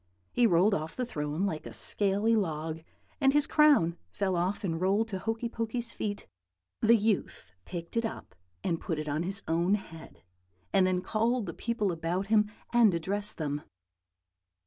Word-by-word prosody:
He 240 - +4
rolled 190 +2 +4
off 155 -2 -2
the 250 - -1
throne 150 -3 -2
like 160 -6 -3
a - - -9
scaly 205 +3 +2
log, 160 -5 -2 0.4
and 270 -2 +4
his 295 0 +4
crown 290 - +4
fell 190 - -1
off 180 +5 -1
and 165 -3 -2
rolled 200 +4 +2
to 190 -3 -3
Hokey 225 +4 -2
Pokey's 230 0 -4
feet. 205 -1 -4 0.6
The 230 +1 +6
youth 205 - -1
picked 170 +1 -7
it 230 - +2
up 225 - -5 0.3
and 165 -2 -1
put 165 - -2
it 155 0 -4
on 150 +2 -1
his 195 +3 -3
own 170 +5 +2
head, 165 -5 -10 0.5
and 185 -1 +5
then 185 -1 +1
called 225 +3 0
the 170 - -5
people 220 -2 -1
about 170 +3 -2
him 210 -1 +4 0.2
and 225 -6 +5
addressed 200 +5 -1
them. 145 -2 -2
195 Hz, 170 wpm, -30 LUFS, 165-225 Hz, 0.6 s, The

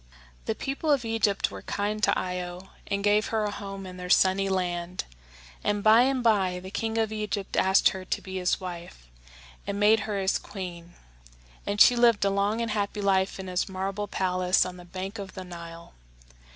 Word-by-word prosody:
The - - -1
people 275 +4 -3
of 275 -5 +3
Egypt 220 -3 +1
were - - -8
kind 210 +1 -2
to - - +3
Io, 180 0 -5 0.2
and 200 0 -2
gave 210 +1 +3
her 220 -1 0
a 205 - -2
home 195 -1 -7
in 185 -1 -9
their 180 0 -7
sunny 190 +1 +4
land; 180 -1 -2 0.6
and 205 -1 0
by 220 +2 +7
and 260 0 +1
by 190 -6 +2
the 185 +1 -9
king 225 +1 -2
of 220 -1 +1
Egypt 210 -2 -3
asked 190 +1 +4
her 190 -1 -6
to - - -2
be 190 0 -7
his 180 -1 +1
wife, 175 - -8 0.6
and 200 0 -2
made 215 +2 +5
her 205 - -1
his 190 0 +1
queen; 175 -3 -8 0.7
and 205 +1 -1
she 245 - +8
lived 235 -4 +4
a 200 - +2
long 200 +3 0
and 230 -2 -2
happy 205 0 -2
life 195 -1 +1
in 190 - -5
his 180 0 -1
marble 195 +2 -3
palace 185 -1 +1
on 180 0 -7
the 175 - -12
bank 190 +4 -6
of 195 -1 -8
the 185 - -6
Nile. 170 -1 -10
195 Hz, 195 wpm, -27 LUFS, 185-210 Hz, 0.7 s, she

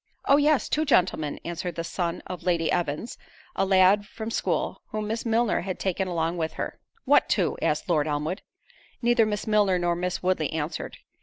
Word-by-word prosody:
"Oh! 280 - +6
yes, 295 -1 +3
two 310 - +1
gentlemen:" 180 - +1
answered 170 0 -4
the 165 - -3
son 170 0 -3
of 180 - -6
Lady 170 -3 +1
Evans, 165 +6 -2 0.4
a - - +1
lad 190 +2 +5
from 220 0 -6
school, - - -1
whom 215 0 -4
Miss 225 +2 -3
Milner 230 0 +2
had 185 0 -4
taken 190 0 -1
along 170 -1 -1
with 160 -1 -2
her. - - -5 0.3
"What - - +4
two?" - - +1
asked 150 - 0
Lord 155 -4 +2
Elmwood. 150 +6 -2 0.6
Neither 235 -2 +4
Miss 210 -1 -2
Milner 210 -4 +3
nor 175 -1 +1
Miss 180 +1 -3
Woodley 180 -5 +1
answered. 160 0 -4
180 Hz, 180 wpm, -26 LUFS, 165-215 Hz, 0.6 s, Oh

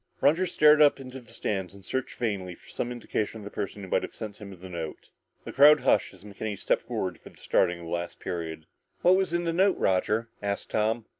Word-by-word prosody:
Roger 165 +6 +3
stared 150 -2 +5
up 145 -2 +6
into 130 0 -8
the 120 - -18
stands 95 -2 -3
and 100 -1 -14
searched 130 0 -3
vainly 100 -7 -2
for - - -21
some 120 - -3
indication 115 -2 -3
of - - -10
the 100 - -7
person 100 0 -5
who - - -7
might - - +2
have - - -7
sent 105 -2 -7
him 100 -4 -10
the 95 - -9
note. 85 -3 -7 0.3
The - - -8
crowd 145 +2 +7
hushed 105 - +3
as 95 - -17
McKenny 105 0 -5
stepped - - +1
forward 95 - -3
for - - -12
the - - -21
starting 90 0 +1
of - - -9
the 80 - -7
last 85 0 -3
period. 80 -2 -5 0.4
"What 180 +1 +6
was 190 -2 +1
in 175 0 0
the 165 -1 -1
note, 190 +3 +3
Roger?" 105 +5 +1
asked 100 -1 -3
Tom. 110 +1 0
105 Hz, 235 wpm, -27 LUFS, 95-135 Hz, 0.4 s, crowd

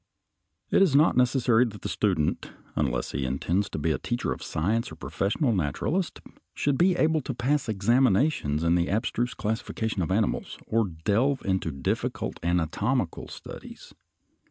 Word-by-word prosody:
It - - +4
is 175 -8 +4
not 155 +4 +5
necessary 125 -2 +4
that 105 -3 -8
the - - -2
student, 90 -8 0 0.3
unless - - -1
he 70 - -2
intends 85 +10 0
to - - -5
be 80 +2 0
a 70 - -1
teacher 120 0 -2
of - - -11
science 105 +9 -1
or - - -9
a - - -25
professional 115 +6 0
naturalist, 100 - -1 0.3
should 145 -1 +1
be 180 +4 +3
able 160 -2 +2
to 130 -1 -5
pass 130 +1 0
examinations 110 - +2
in 85 0 +3
the 85 0 +1
abstruse 115 +4 -1
classification 110 -1 -2
of 85 - -1
animals 105 +3 0
or 115 0 +1
delve 105 - 0
into 95 -4 0
difficult 70 -3 -3
anatomical 90 +5 0
studies. - - -10
110 Hz, 155 wpm, -27 LUFS, 85-130 Hz, 0.3 s, not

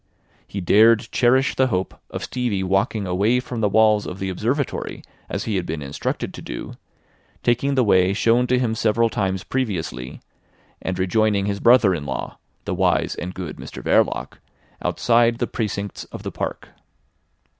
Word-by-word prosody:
He 100 - -5
dared 110 +5 +5
cherish 130 +2 +3
the 130 - +2
hope 95 -5 -1 0.2
of - - -5
Stevie 120 -7 -2
walking 95 +2 0
away 100 +7 +2
from 125 -2 -5
the 105 - +2
walls 110 0 +4
of 90 - -6
the 95 0 -3
Observatory 125 +9 -2 0.3
as - - -3
he 105 -3 -1
had 90 - -2
been 75 -2 -4
instructed 70 +1 -3
to - - -9
do, - - -7 0.7
taking 130 +4 +1
the 130 - +4
way 95 -3 +4
shown 115 +4 +3
to 125 - +2
him 120 -3 0
several 115 +1 +2
times 95 -2 -1
previously, 85 - -3 0.6
and 95 -1 -3
rejoining 100 +2 +2
his 100 0 -2
brother 120 -5 +5
in 75 -4 -4
law, 65 -2 -5 0.3
the - - -2
wise - - +1
and 90 +1 -6
good 90 -4 -6
Mr - - -9
Verloc, - - +1 0.4
outside 120 0 +2
the 120 - 0
precincts 100 -4 -4
of - - -10
the - - -4
park. - - -5
105 Hz, 165 wpm, -22 LUFS, 95-120 Hz, 0.7 s, dared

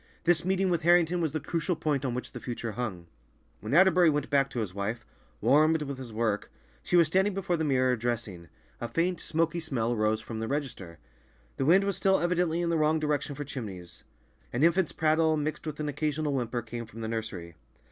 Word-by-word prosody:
This 170 -1 +3
meeting 190 0 +1
with 170 - +1
Harrington 175 +1 +4
was 160 -3 0
the 155 - -2
crucial 165 +3 -2
point 150 -3 -1
on 125 -3 -1
which 125 - -5
the - - -7
future 120 -2 -5
hung. 100 -6 -4 0.5
When 110 - -2
Atterbury 180 -1 +6
went 145 -1 -1
back 140 -1 +3
to 130 - -8
his 105 -5 -3
wife, 110 +4 -3 0.4
warmed 155 +6 +4
with 140 -2 -6
his 125 -3 -8
work, 110 -2 -1 0.3
she 125 - -1
was 170 -1 +7
standing 190 +5 +1
before 185 -3 0
the 160 - -1
mirror, 130 -3 +2
dressing; 110 -7 -4 0.3
a 120 - -3
faint, 170 +9 0
smoky 165 +1 0
smell 125 -8 -1
arose 110 -1 +1
from 110 0 -7
the 110 - -3
register. 125 - -4 0.6
The 135 - 0
wind 185 +6 +5
was 200 -1 -1
still 190 0 +3
evidently 175 -1 +1
in 170 - 0
the 165 - +2
wrong 155 +1 +3
direction 150 -1 -1
for 145 - -4
chimneys. 95 - -8 0.5
An 130 - 0
infant's 170 +1 +3
prattle, 160 0 +2
mixed 155 +1 -3
with 150 -1 -5
an 150 - -2
occasional 150 0 -1
whimper, 120 -2 -2
came 115 0 -6
from 115 +1 -10
the 110 - -3
nursery. 110 -7 -5
145 Hz, 210 wpm, -28 LUFS, 115-165 Hz, 0.6 s, was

